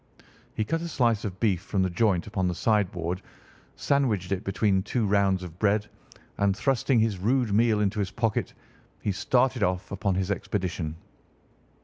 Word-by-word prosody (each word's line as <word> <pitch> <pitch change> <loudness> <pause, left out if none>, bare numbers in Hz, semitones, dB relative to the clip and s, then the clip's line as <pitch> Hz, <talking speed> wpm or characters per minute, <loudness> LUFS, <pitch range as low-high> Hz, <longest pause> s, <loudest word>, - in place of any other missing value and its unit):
He 110 - 0
cut 165 +8 -1
a 170 - -4
slice 120 -9 +1
of 95 -2 -5
beef 100 -7 +1
from 95 -1 -1
the 95 - +1
joint 95 -2 +1
upon 95 -2 -1
the 90 - -1
sideboard, 90 -5 0 0.5
sandwiched 110 -10 0
it 95 +1 -1
between 100 -1 +1
two 110 +3 -1
rounds 100 -2 +2
of 90 0 -10
bread, 105 0 +2 0.5
and 100 -1 +2
thrusting 135 -2 +2
this 110 -4 0
rude 120 +2 +1
meal 110 0 +3
into 105 +1 0
his 100 -2 0
pocket 115 0 -1 0.5
he 105 - -1
started 125 +5 +1
off 90 -2 -1
upon 100 -1 -1
his 95 +1 -1
expedition. 90 -6 -2
100 Hz, 165 wpm, -27 LUFS, 95-115 Hz, 0.5 s, meal